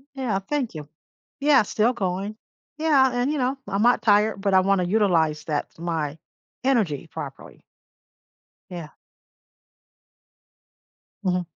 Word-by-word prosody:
Yeah, 240 -8 -1
thank 255 +2 -3
you. 150 -2 -7 0.5
Yeah, 285 -5 +5
still 220 +4 +1
going. 195 0 -3 0.4
Yeah, 285 -5 +4
and, 245 +4 0
you 305 - -1
know, 260 +1 0
I'm 195 +1 -1
not 245 +1 +4
tired, 210 -1 +3
but 200 -1 +1
I 185 - +6
wanna 195 -1 +2
utilize 170 -7 +2
that 150 -2 -2
my 160 -3 -2 0.5
energy 215 - +1
properly. - - -8 1.1
Yeah. 170 -4 -7 2.3
Mhm. 180 -1 0
200 Hz, 120 wpm, -24 LUFS, 175-250 Hz, 2.3 s, I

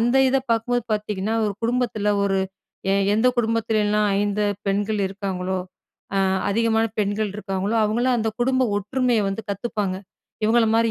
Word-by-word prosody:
அந்த 240 +3 +2
இத 265 - +2
பாக்கும்போது 230 +1 +1
பாத்தீங்கன்னா, 210 0 -1
ஒரு 205 - -1
குடும்பத்துல 230 -3 0
ஒரு 195 -1 +1 0.6
எ - - +3 0.2
எந்த 220 +4 +2
குடும்பத்துலலாம் 220 -2 +1
5 205 +1 0 0.2
பெண்கள் 205 +2 0
இருக்காங்களோ, 190 -1 -3 0.6
அ - - +3 0.3
அதிகமான 225 +2 +2
பெண்கள் 205 0 0
இருக்காங்களோ, 195 +1 -2
அவங்கலாம் 240 +4 +1
அந்த 220 0 0
குடும்ப 260 +1 +2 0.2
ஒற்றுமைய 245 +3 +1
வந்து 195 +3 -4
கத்துப்பாங்க. 200 -1 -2 0.5
இவுங்கள 225 +1 +4
மாரி 230 0 +3
215 Hz, 140 wpm, -23 LUFS, 200-230 Hz, 0.6 s, இவுங்கள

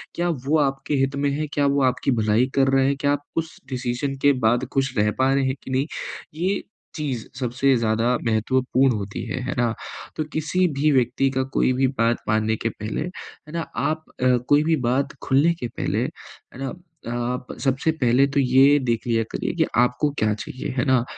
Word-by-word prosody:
क्या 175 +1 0 0.2
वो 150 +3 +3
आपके 135 0 0
हित 135 +1 -1
में 140 0 +1
है, 150 +2 -2
क्या 145 - +2
वो 140 0 +2
आपकी 130 +1 +1
भलाई 110 +3 +3
कर 135 -1 +4
रहा 135 0 +4
है, 140 - +2
क्या 140 +1 0
आप 145 0 -1
उस 165 0 -2
डिसीज़न 130 +1 -2
के 145 0 +5
बाद 120 +3 +3
खुश 135 -1 0
रह 105 0 +3
पा 130 +1 +3
रहे 135 -1 +2
हैं 130 0 0
कि 130 - -7
नहीं, 130 +2 +1 0.5
ये 185 +5 -1 0.3
चीज़ 135 -7 -3
सबसे 130 +2 +2
ज़्यादा 115 +2 +1
महत्वपूर्ण 125 +3 +2
होती 100 0 -5
है, - - -3
है 125 - -2
ना। 120 -2 +2 0.4
तो 155 - -1
किसी 170 +4 +1
भी 150 +1 +4
व्यक्ति 130 +1 +2
का 130 0 0
कोई 130 - +3
भी 130 +1 +2
बात 115 +1 +3
मानने 110 0 +2
के 115 - -1
पहले, 105 0 -5
है 175 -3 -9
ना, 170 - -1
आप 155 0 -1 0.2
अ, 125 -1 +5
कोई 145 +1 +5
भी 160 +1 +2 0.2
बात 140 +3 0
खुलने 145 +6 +3
के - - 0
पहले, 115 - -2
है 130 - -10
ना, 135 - -3 0.4
आप 120 +1 -3 0.2
सबसे 135 +3 +1
पहले 130 -3 +3
तो 140 +1 0
ये 135 +2 +5
देख 115 -2 0
लिया 115 -1 +2
करिए - - -2
कि - - +3 0.2
आपको 125 +4 +2
क्या 110 -1 +2
चाहिए, 130 +5 -6
है 130 - +1
ना। 130 -3 +3
130 Hz, 205 wpm, -23 LUFS, 120-145 Hz, 0.5 s, के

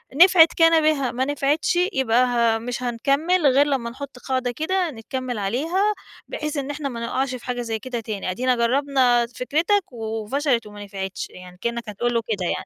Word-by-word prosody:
نفعِت 340 -1 +7
كان 330 -1 +5
بها 285 -5 +2
ما 255 +2 -1
نفعِتش 290 +3 0 0.2
يبقى 255 -1 +3
ه 235 -2 +2
مش 245 +1 -5
هنكَمُّل، 280 +8 +1
غير 275 +2 +5
لمّا 255 -5 -1
نحُطّ 265 0 -9
قاعدة 255 -2 -1
كده 350 +4 -1
نكَمّل 250 +1 -5
عليها 325 - 0 0.3
بحيث 300 -1 -4
إن 280 +1 -2
إحنا، 290 -1 -4
ما 235 -3 -6
نُقعش 255 +1 -1
في 245 - -10
حاجة 245 -1 -2
زي 225 -2 -3
كده 245 0 -4
تاني، 210 -4 -4
أدِينا 250 +6 +1
جرّبنا 245 -1 +2
فِكرتَك 335 +8 0
وفشلِت 225 +2 -1
وما 205 0 -10
نفعتش 195 -1 -5
يعني، 180 0 -13
كأنّك 235 -1 -3
هتقول 240 +4 -1
له 230 - +1
كده 200 -5 -2
يعني - - -3
255 Hz, 180 wpm, -23 LUFS, 230-290 Hz, 0.3 s, نفعِت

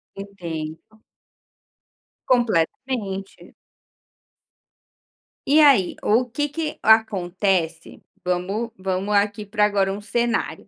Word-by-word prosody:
Entendo. 175 -1 -8 1.3
Completamente. 215 -2 -1 1.9
E 300 +3 +5
aí, 270 -12 +5
ou 245 +4 +2
que 290 +5 -2
que 310 +1 -4
acontece 190 -5 +1 0.2
vamos 185 +6 -2
vamos 190 +2 -2
aqui 205 +1 +1
pra 210 +1 0
agora 195 -2 +1
um 205 - -7
cenário. 235 +3 -2
205 Hz, 85 wpm, -22 LUFS, 185-235 Hz, 1.9 s, E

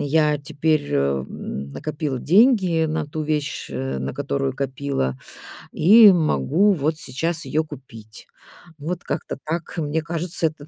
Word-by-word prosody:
я 150 0 +2
теперь, 145 +1 -1
м, 70 0 -2
накопила 145 - -4
деньги 185 - +4
на 155 -1 -2
ту 155 +1 -4
вещь, 150 -1 -2
э, 65 0 -3
на 65 +1 -4
которую 135 -1 -2
копила. 135 - -2 0.5
И 210 +5 +8
могу 175 +3 +2
вот 155 -1 -1
сейчас 165 +3 -2
её 155 +1 0
купить". 120 -8 -12 0.5
Вот 170 +4 -5
как-то - - -4
так. 160 +1 -4
Mне 160 0 -1
кажется, 165 +1 -2
это 155 -2 -9
150 Hz, 135 wpm, -22 LUFS, 135-165 Hz, 0.5 s, И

